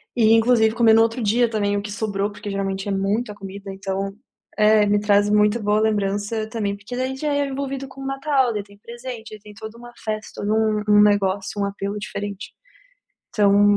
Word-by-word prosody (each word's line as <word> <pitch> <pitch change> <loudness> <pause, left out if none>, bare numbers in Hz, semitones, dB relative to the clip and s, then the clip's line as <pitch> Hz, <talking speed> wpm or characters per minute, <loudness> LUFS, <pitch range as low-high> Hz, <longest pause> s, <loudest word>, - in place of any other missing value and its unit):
E 225 -2 +5
inclusive, 225 -1 +4
comer 230 -2 +5
no 225 - +6
outro 230 +2 +1
dia 230 +3 +2
também 205 -2 0
o - - -1
que 205 0 -7
sobrou, 205 -1 -2
porque, 205 +1 -8
geralmente, 195 0 -3
é - - -1
muita 205 +3 -1
comida, 195 0 -8
então 195 0 -3 0.5
É, 210 -1 +5
me 205 0 +3
traz 205 0 +3
muita 210 +2 +3
boa 210 0 +1
lembrança 210 +1 -1
também, 210 -3 -2
porque 205 +5 -8
daí, 260 +1 -2
já 295 +2 -2
é 285 0 +1
envolvido 275 0 -4
com 265 +1 -12
o - - -6
Natal, 270 -2 +1
daí 210 -1 -3
tem 200 0 -18
presente, 235 -1 -8
aí - - -14
tem 210 +1 -14
toda 220 +2 -9
uma 240 0 -12
festa, 215 -1 -5
todo 205 - -1
um 220 -1 +1
um 210 0 +6
negócio, 205 -1 +1
um - - +1
apelo 200 +1 -4
diferente. 205 -1 -6 0.8
Então 205 0 +4
210 Hz, 205 wpm, -22 LUFS, 205-230 Hz, 0.8 s, no